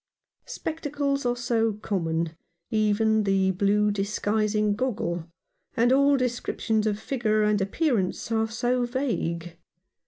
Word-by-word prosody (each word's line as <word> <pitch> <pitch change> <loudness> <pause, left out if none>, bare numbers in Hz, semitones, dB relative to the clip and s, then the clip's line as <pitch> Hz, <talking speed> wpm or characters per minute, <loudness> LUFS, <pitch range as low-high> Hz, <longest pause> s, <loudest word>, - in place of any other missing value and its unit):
Spectacles 285 -4 -2
are 245 - +1
so 230 -2 0
common 170 -6 -2 0.2
— 170 0 -52
even 220 0 +2
the 195 -1 +2
blue 205 +2 +2
disguising 210 +1 0
goggle 175 -9 -2 0.2
— - - -39
and 240 +2 +4
all 280 +1 +4
descriptions 235 -3 -1
of 205 -1 0
figure 220 -3 0
and 210 -1 +2
appearance 215 - 0
are 225 0 +1
so 245 +2 0
vague. 175 -10 -2
215 Hz, 125 wpm, -26 LUFS, 200-245 Hz, 0.2 s, and